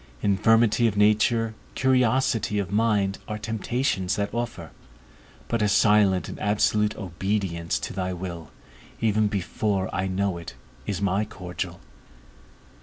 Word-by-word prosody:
Infirmity 115 +3 +4
of 105 -2 -2
nature, 110 +2 +3 0.2
curiosity 125 -4 +2
of 100 -3 -2
mind, 105 -2 +1
are 105 - -3
temptations 110 -2 -1
that 100 0 -2
offer; 120 0 -4 0.8
but 115 - -1
a 105 - +2
silent 105 -3 +4
and - - -8
absolute 105 0 +1
obedience 95 -2 -2
to - - -5
thy 95 -1 -2
will, 85 -4 -6 0.5
even 110 -1 +2
before 100 0 -1
I 95 +2 -1
know 95 -1 -1
it, 85 - -9 0.3
is 100 -1 -2
my 100 +2 +1
cordial. 90 -3 -6
105 Hz, 125 wpm, -25 LUFS, 95-110 Hz, 0.8 s, Infirmity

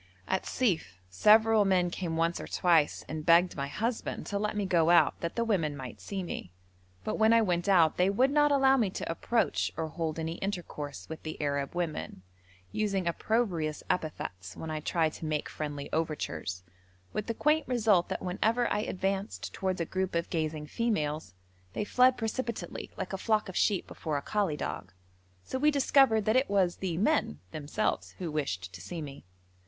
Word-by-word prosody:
At 190 - -1
Sief 160 - 0
several 215 - +5
men 185 -3 +2
came 170 -3 -3
once 165 +1 +1
or - - -6
twice 165 -4 +2
and 155 0 -4
begged 170 +2 +5
my 140 -1 -2
husband 225 - -3
to 200 - -2
let 210 0 -1
me 205 - 0
go 170 -3 +3
out 175 0 +5
that 170 - -3
the 235 - +1
women 165 -10 0
might 130 -3 -8
see 195 -2 -4
me, 90 - -6 0.5
but - - -2
when 220 +1 +5
I 230 -1 +5
went 175 -1 0
out 170 -5 +5
they 180 +2 +4
would 255 +7 +3
not 295 0 +4
allow 270 -1 +5
me 220 -6 +2
to 185 - -4
approach 230 +7 0
or 160 -1 -2
hold 160 -1 -3
any 165 +1 -3
intercourse 150 - -5
with 160 - -7
the 155 - -6
Arab 140 +1 -1
women, 165 - -3 0.5
using 195 -4 -1
opprobrious 170 -5 0
epithets 95 - -4
when 160 - -5
I 155 - -2
tried 160 0 0
to - - -7
make 155 -1 -1
friendly 145 -2 -5
overtures, 150 - -2 0.5
with 215 - -3
the 230 - -2
quaint 300 +3 +2
result 220 -8 +3
that - - -3
whenever 220 +6 +1
I - - +1
advanced 195 0 -2
towards 185 -1 -2
a 170 - 0
group 185 +1 -2
of 170 0 -1
gazing 155 -2 -2
females 155 - -2 0.4
they - - -1
fled 250 +4 +4
precipitately 225 -4 -4
like 185 - -4
a 195 - -3
flock 215 0 +1
of 185 - -8
sheep 200 -4 +2
before 155 -3 -3
a 140 - -4
collie 200 -8 0
dog, 95 -7 -5 0.5
so 260 - -4
we 300 +3 +5
discovered 270 -6 +4
that 220 - +2
it 260 +2 +3
was 190 -3 +2
the 180 -4 -2
men 120 - +1
themselves 155 +8 -2
who 175 -4 -4
wished 95 -12 -3
to 90 - -9
see 160 - -6
me. 140 -7 -9
180 Hz, 190 wpm, -30 LUFS, 155-215 Hz, 0.5 s, several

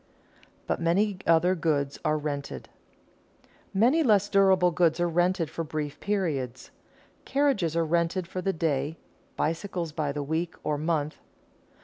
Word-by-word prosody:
[Sidenote: - - -32
But - - -2
many 190 +4 +2
other 170 +2 +4
goods 150 -5 -1
are 155 - +2
rented] 140 - -5 1.0
Many 245 +11 +3
less 205 -7 +3
durable 190 -3 +4
goods 170 0 +2
are 175 - +2
rented 175 0 +1
for 165 - -3
brief 150 -2 -4
periods. 150 - -2 0.5
Carriages 270 - +1
are 165 -1 +2
rented 170 +3 0
for 185 +1 -5
the 195 - +1
day, 155 -2 -1 0.4
bicycles 170 0 -2
by 150 -2 -2
the 145 0 -3
week 160 +4 -2
or 150 -1 -1
month. 155 -1 -1
165 Hz, 140 wpm, -27 LUFS, 150-185 Hz, 1.0 s, other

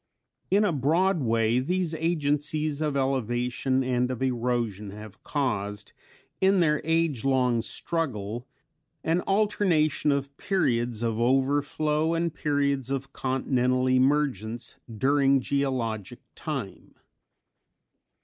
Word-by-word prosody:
_ - - -43
In 210 - +4
a 190 - +1
broad 165 +6 +2
way 115 0 +2
these 175 +4 -1
agencies 155 -2 0
of 150 -2 0
elevation 130 0 0
and 125 -1 0
of 130 0 -3
erosion 120 -5 -1
have 105 0 -11
caused 105 -8 -2 0.5
in 190 0 +4
their 150 -3 +2
age 160 -5 +1
long 125 -3 +2
struggle 120 -6 -3 0.6
an 165 +2 +1
alternation 190 -8 +2
of 140 0 -2
periods 120 - 0
of 115 -1 -1
overflow 145 +5 +1
and 165 -1 -1
periods 140 -3 0
of 135 0 -3
continental 130 -1 0
emergence 130 -4 +1 0.2
during 135 +2 +3
geologic 125 -7 -2 0.2
time. - - -6
135 Hz, 110 wpm, -27 LUFS, 120-155 Hz, 0.6 s, In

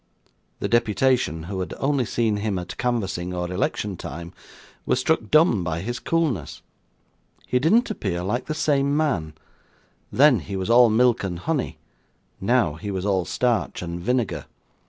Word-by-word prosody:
The - - 0
deputation, 120 - +1
who 95 +3 -5
had 90 - -4
only 135 -2 +1
seen 110 -2 0
him 105 -2 -1
at 90 0 -6
canvassing 95 -8 -1
or 90 0 -3
election 95 +1 -2
time, 85 +4 -7 0.5
were - - +1
struck 145 +6 0
dumb 155 - +4
by 80 0 -2
his 120 +5 -4
coolness. 145 - -1 0.8
He 125 - +1
didn't 215 - +3
appear 90 - -3
like 120 +7 -2
the 155 - -2
same 140 -2 +1
man; 95 - 0 0.8
then 140 -4 +5
he 100 +2 -6
was 95 +4 -1
all 120 0 +7
milk 120 +1 +3
and 90 -3 -3
honey; 145 - -2 0.6
now 110 -6 +2
he 80 +7 -7
was 95 -1 -3
all 95 -3 +1
starch 110 +2 -1
and 85 0 -5
vinegar. 105 - -1
105 Hz, 155 wpm, -24 LUFS, 90-130 Hz, 0.8 s, all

